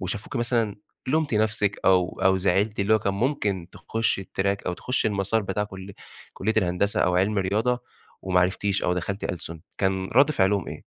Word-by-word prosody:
وشافوكِ 100 +8 -5
مثلًا 120 -3 0 0.3
لُمتِ 155 -2 +1
نَفْسِك 105 -2 +1
أو 90 -1 +3
أو 95 0 +5
زعلتِ، 100 +3 +1
اللي 105 +2 +3
هو 110 - +4
كان 100 -1 -1
ممكن 100 - -1
تخشي 115 -3 -1
الTrack 100 +1 -1
أو - - 0
تخشي 125 +5 -1
المسار 100 +2 0
بتاع 100 +1 -1
كل 95 -1 -9 0.4
كلية 110 +3 -1
الهندسة 90 +3 +1
أو 90 - +2
عِلمي 100 +3 +2
رياضة 110 +6 0 0.4
وما 90 -1 +2
عرفتيش، 95 +2 0
أو 90 - +1
دخلتِ 95 +3 -3
ألسن، 85 -2 -5 0.2
كان 95 -1 0
رد 140 +4 +6
فعلهم 95 - +1
إيه؟ - - -8
100 Hz, 175 wpm, -25 LUFS, 95-110 Hz, 0.4 s, رد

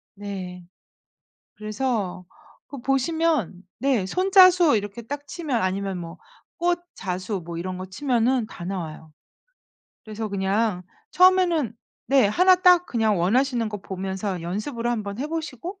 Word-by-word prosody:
네. 190 -3 -7 0.9
그래서 215 -4 -3 0.4
그 280 - -8
보시면 270 - 0 0.2
네. 260 -8 +1
손자수 365 - +5
이렇게 205 +2 -5
딱 285 +5 -6
치면 285 -8 -2
아니면 190 0 -1
뭐 165 -1 -8 0.4
꽃 350 0 +1 0.2
자수 185 0 -4
뭐 170 -1 -5
이런 185 +1 -4
거 185 - -6
치면은 240 +3 0
다 175 - -9
나와요. 160 -4 -6 0.9
그래서 220 0 -5
그냥 195 0 0 0.3
처음에는 355 - +4 0.3
네. 265 -6 +4
하나 365 - +5
딱 360 -1 +5
그냥 220 - +1
원하시는 235 +5 +1
거 210 -1 -5
보면서 190 0 -4
연습으로 215 - -3
한번 210 -3 -3
해 280 - -2
보시고 325 - -5
220 Hz, 260 characters per minute, -24 LUFS, 190-290 Hz, 0.9 s, 손자수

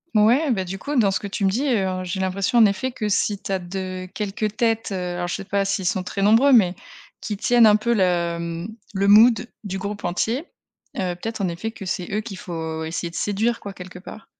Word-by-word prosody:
Ouais, 245 +8 +4
bah, 190 -5 0
du 190 +2 -5
coup, 285 +9 -3
dans 215 -5 +4
ce 195 - -1
que 205 - -4
tu 200 0 -2
me - - +4
dis, 240 +9 -1
heu, 190 -6 0
j'ai 185 +1 -4
l'impression, 190 +6 0
en 225 - +8
effet, 210 +6 0
que 220 -4 -3
si 205 0 +1
tu - - -8
as 190 -1 0
de 185 0 -5
quelques 210 +1 -3
têtes 225 -2 +1
alors, 180 -2 -3
je - - -1
sais 195 - -6
pas 200 +1 0
s'ils 195 -1 -1
sont 185 +1 0
très 195 +2 -4
nombreux 225 +8 +5
mais, 195 -8 +5 0.5
qui 210 -3 -4
tiennent 240 +3 +5
un 210 -1 +6
peu 235 +2 0
le 170 -3 0 0.3
le 200 0 +1
mood 225 +3 +6 0.2
du 195 -2 -4
groupe 200 +2 -5
entier, 220 +8 0 0.6
heu, 180 -2 -1
peut-être 220 +5 -5
en 195 - 0
effet 175 +6 -4
que 220 -3 -9
c'est 180 0 -3
eux 210 - 0
qu'il 210 -3 -7
faut 160 -3 -5
essayer 165 +2 -3
de 170 - -13
séduire 215 +6 0
quoi, 200 - -6
quelque 180 -1 -10
part. 215 +4 -11
195 Hz, 235 wpm, -23 LUFS, 185-220 Hz, 0.6 s, en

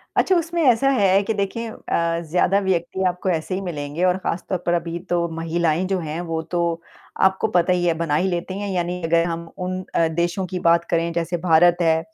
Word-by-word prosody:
अच्छा, 375 - +3
उसमें 335 0 0
ऐसा 265 0 +4
है 200 -7 +3
के 220 - -1
देखें 210 +3 -2
अ, 170 -5 -1
ज़्यादा 180 +3 +3
व्यक्ति 190 -1 -1
आपको 180 +1 -2
ऐसे 170 +1 -1
ही 190 - -3
मिलेंगे 155 -2 -4
और 180 0 +2
खास 175 -2 -3
तौर 185 - 0
पर 175 - +2
अभी 170 0 -2
तो 175 -1 +1
महिलाएँ 165 0 0
जो 190 -1 0
हैं, 160 -1 -4
वो 165 -2 -3
तो 170 0 -2 0.4
आपको 190 +2 +3
पता 180 -3 +2
ही 175 -1 0
है 170 - +3
बना 165 -3 0
ही 180 +5 +1
लेती 180 +2 -3
हैं 205 0 -3
यानी 180 -1 -2
अगर 165 +1 +3
हम 170 0 -4
उन 185 0 -3
अ, 165 - +3
देशों 170 +3 -1
की 180 +1 -4
बात 170 0 +3
करें, 170 0 +1
जैसे 170 +1 -1
भारत 170 0 +4
है 160 -1 +3
175 Hz, 215 wpm, -22 LUFS, 170-190 Hz, 0.4 s, ऐसा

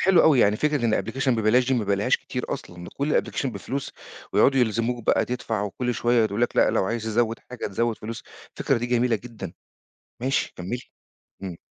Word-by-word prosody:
حلو 185 -3 +5
أوي 145 -6 +5
يعني 105 0 +4
فكرة 150 -3 +1
إن 110 -3 +2
application 130 +4 -2
ببلاش 120 +2 +3
دي 130 - +3
ما 115 -4 0
بالاقيهاش 100 +1 +2
كتير - - -5
أصلًا، 85 0 -7
ده - - -9
كُلّ 145 +2 +2
الapplication 140 - -3
بفلوس، 130 +4 -4 0.4
ويقعدوا 135 -1 +4
يلزموك 115 +1 0
بقى - - +3
تدفع، 115 -4 -2
وكُلّ 120 +4 -2
شوية 120 +2 +2
يقولوا 105 -1 -2
لك - - -6
لأ - - +5
لو - - +1
عايز 115 +3 -2
تزود 115 +1 0
حاجة 125 - -4
تزود 115 +2 -1
فلوس، 110 +1 -6 0.4
الفكرة - - +1
دي 120 - -2
جميلة 120 -1 +2
جدًا، 105 -6 -8 0.7
ماشي 135 +2 0
كمّلي، 110 +8 -4 0.6
إمم. 90 -3 -6
115 Hz, 195 wpm, -25 LUFS, 105-125 Hz, 0.7 s, حلو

